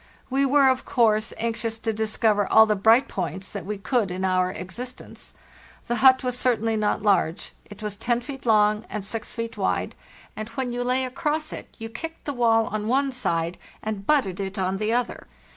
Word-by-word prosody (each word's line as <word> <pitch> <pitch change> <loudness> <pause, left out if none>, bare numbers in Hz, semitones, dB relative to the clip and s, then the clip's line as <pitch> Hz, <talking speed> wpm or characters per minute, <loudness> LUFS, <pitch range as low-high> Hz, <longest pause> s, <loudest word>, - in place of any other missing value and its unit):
We 275 +1 +2
were, 275 0 +5
of 260 -1 +2
course, 220 -3 +2
anxious 225 0 -2
to 225 0 -2
discover 215 -1 +1
all 220 - +8
the 215 -1 +1
bright 225 +7 +4
points 190 +1 -4
that 175 - -6
we 210 0 -3
could 205 +2 0
in 185 +1 -2
our 185 -1 +2
existence. 235 +8 -8 0.5
The 240 - -1
hut 260 +1 +6
was 250 -1 -1
certainly 225 -3 +1
not 210 -1 0
large; 195 -5 +1
it 205 +1 -12
was 210 -1 -4
10 235 +2 0
feet 270 +2 -8
long 210 -1 +4
and 210 -2 -5
6 220 +2 -4
feet 230 -1 -5
wide, 90 -1 -1 0.4
and 215 +1 -6
when 245 +1 -3
you 245 0 -2
lay 255 +1 +1
across 305 +4 -2
it - - -9
you 225 - -6
kicked 325 +8 -8
the 290 - -2
wall 225 -3 +3
on 215 0 -3
one 270 +3 +2
side 170 -8 -1 0.2
and 210 -2 -4
butted 235 -11 +2
it 195 +1 -4
on 190 0 0
the 215 +2 -1
other. 245 - -2
225 Hz, 195 wpm, -24 LUFS, 200-250 Hz, 0.5 s, all